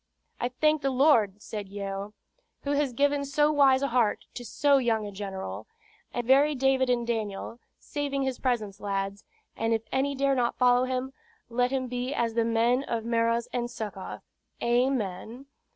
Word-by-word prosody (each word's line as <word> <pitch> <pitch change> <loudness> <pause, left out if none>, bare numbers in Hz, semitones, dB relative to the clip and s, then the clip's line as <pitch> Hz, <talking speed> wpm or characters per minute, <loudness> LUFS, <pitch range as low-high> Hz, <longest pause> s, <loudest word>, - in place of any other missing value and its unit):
"I 245 - 0
thank 305 +4 +2
the 275 - +1
Lord," 250 -7 +3
said 205 -3 -6
Yeo, 200 +1 -5 0.5
"who 285 - -2
has 285 -2 +1
given 285 +3 +1
so 295 +2 +2
wise 275 -2 +4
a 280 - +1
heart 235 -3 +1
to 245 - -7
so 280 +4 +3
young 225 -4 +1
a 205 - -6
general; 195 -1 -6 0.4
a 240 - -2
very 280 +4 +4
David 265 -1 +2
and 240 -1 +1
Daniel, 225 0 -3 0.2
saving 280 -2 -3
his 265 -2 -2
presence, 220 -6 -1
lads; 200 0 -3 0.3
and 225 0 +1
if 225 - -3
any 275 +1 0
dare 275 0 +2
not 240 -3 0
follow 250 0 +4
him, 260 +1 -3 0.4
let 245 +1 +2
him 265 -1 -1
be 250 +2 -3
as 230 -3 0
the 230 0 +2
men 230 +3 +2
of 230 -1 -3
Meroz 230 0 +1
and 240 -1 -1
Succoth. 210 -5 -6 0.4
Amen! 240 -1 0
245 Hz, 170 wpm, -28 LUFS, 225-270 Hz, 0.5 s, wise